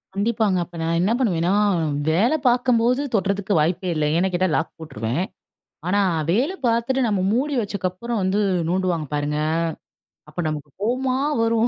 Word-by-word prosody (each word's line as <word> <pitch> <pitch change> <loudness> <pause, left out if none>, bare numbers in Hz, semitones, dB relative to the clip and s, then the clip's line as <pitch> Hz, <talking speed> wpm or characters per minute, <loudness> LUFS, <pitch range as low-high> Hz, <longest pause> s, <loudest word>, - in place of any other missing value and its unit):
கண்டிப்பாங்க. 210 -2 +1
அப்ப 170 - -16
நான் 165 +1 0
என்ன 195 +5 +2
பண்ணுவேன்னா, 180 -6 +1 0.6
வேலை 215 - +3
பார்க்கும்போது 245 +1 +3
தொட்றதுக்கு 200 0 0
வாய்ப்பே 180 +3 0
இல்ல, 155 -1 +1
ஏன்னு 185 +2 +1
கேட்டா, 185 +1 +2
லாக் - - -2
போட்ருவேன். 135 -1 -3 0.6
ஆனா, 200 +3 +2 0.3
வேலை 260 - +1
பார்த்துட்டு 235 +3 +1
நம்ம 205 -3 +1
மூடி 275 +5 0
வச்சக்கப்புறம் 200 +3 -3
வந்து 190 +3 +1 0.3
நோண்டுவாங்க 180 -3 0
பாருங்க, 145 +1 -1 0.9
அப்ப 155 +4 -9
நமக்கு 150 -1 -4
கோவமா 255 +4 0 0.2
வரும். 230 0 +2
195 Hz, 140 wpm, -22 LUFS, 170-235 Hz, 0.9 s, வேலை